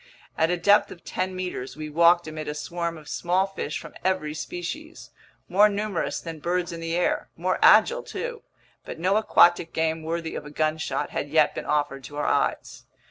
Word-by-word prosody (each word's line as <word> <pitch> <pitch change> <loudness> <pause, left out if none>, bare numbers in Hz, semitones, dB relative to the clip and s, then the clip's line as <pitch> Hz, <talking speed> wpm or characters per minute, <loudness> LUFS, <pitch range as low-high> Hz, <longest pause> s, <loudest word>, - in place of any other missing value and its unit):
At 160 - +2
a 180 - +1
depth 205 +3 +4
of 170 - -12
ten 185 0 -3
meters, 180 -8 -5
we 155 0 -5
walked 170 +2 +4
amid 155 0 -6
a 150 - -3
swarm 170 +2 -4
of 150 -1 -14
small 180 +4 +1
fish 195 -6 -4
from - - -10
every 185 -5 0
species, 240 - -7 0.4
more 205 +3 +5
numerous 205 -3 -2
than 165 -2 -7
birds 175 +2 -1
in 170 - -6
the 165 0 -3
air, 180 - 0
more 185 +3 -1
agile 465 - +6
too; 475 0 -6 0.4
but - - -8
no 185 +4 +1
aquatic 175 -5 +4
game 160 0 0
worthy 165 +1 -3
of - - -5
a 150 - -9
gunshot 155 -2 -1
had 145 - -3
yet 155 0 +3
been - - -5
offered 145 -2 -1
to 145 - -9
our 150 - -1
eyes. - - -1
170 Hz, 190 wpm, -25 LUFS, 155-185 Hz, 0.4 s, agile